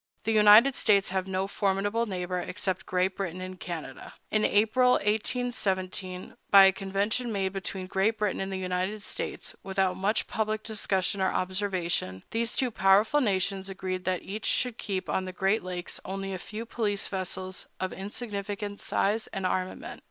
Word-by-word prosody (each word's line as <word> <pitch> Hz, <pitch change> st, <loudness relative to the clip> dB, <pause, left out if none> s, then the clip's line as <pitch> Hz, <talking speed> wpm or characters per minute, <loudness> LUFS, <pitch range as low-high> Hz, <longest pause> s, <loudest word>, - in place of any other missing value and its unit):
The 225 Hz, -, 0 dB
United 215 Hz, +5 st, +8 dB
States 200 Hz, -5 st, +3 dB
have 190 Hz, 0 st, -1 dB
no 190 Hz, 0 st, -1 dB
formidable 205 Hz, +3 st, 0 dB
neighbor, 180 Hz, -2 st, -2 dB
except 190 Hz, +1 st, -3 dB
Great 185 Hz, +1 st, +1 dB
Britain 185 Hz, -2 st, -3 dB
in 185 Hz, 0 st, -6 dB
Canada. 160 Hz, -7 st, -7 dB, 0.2 s
In 215 Hz, 0 st, +2 dB
April, 225 Hz, +5 st, +4 dB
1817, 200 Hz, -4 st, -1 dB, 0.2 s
by 195 Hz, -1 st, +9 dB
a 190 Hz, -, +7 dB
convention 200 Hz, +5 st, -1 dB
made 195 Hz, -2 st, -1 dB
between 190 Hz, -1 st, -4 dB
Great 195 Hz, +4 st, +1 dB
Britain 210 Hz, -3 st, 0 dB
and 195 Hz, 0 st, -3 dB
the 190 Hz, -, -2 dB
United 185 Hz, +3 st, -2 dB
States, -, -, -5 dB
without 190 Hz, -1 st, 0 dB
much 195 Hz, +4 st, 0 dB
public 215 Hz, 0 st, -2 dB
discussion 200 Hz, -3 st, 0 dB
or 190 Hz, -, +2 dB
observation, 185 Hz, -, -1 dB
these 230 Hz, +1 st, -1 dB
two 255 Hz, -2 st, +1 dB
powerful 210 Hz, +7 st, +4 dB
nations 195 Hz, -3 st, 0 dB
agreed 185 Hz, -1 st, -4 dB
that 185 Hz, -1 st, 0 dB
each 210 Hz, +3 st, -4 dB
should 250 Hz, -2 st, +1 dB
keep 190 Hz, -2 st, -3 dB
on 190 Hz, -, 0 dB
the 185 Hz, -, -5 dB
Great 195 Hz, +4 st, +1 dB
Lakes 180 Hz, -1 st, -5 dB
only 195 Hz, 0 st, -4 dB
a 185 Hz, -, -4 dB
few 220 Hz, +5 st, -6 dB
police 210 Hz, -3 st, -1 dB
vessels 185 Hz, -1 st, -4 dB
of 185 Hz, -, -2 dB
insignificant 205 Hz, 0 st, -4 dB
size 215 Hz, +3 st, +1 dB
and 195 Hz, -1 st, -4 dB
armament. 185 Hz, 0 st, -2 dB
195 Hz, 165 wpm, -28 LUFS, 185-210 Hz, 0.2 s, by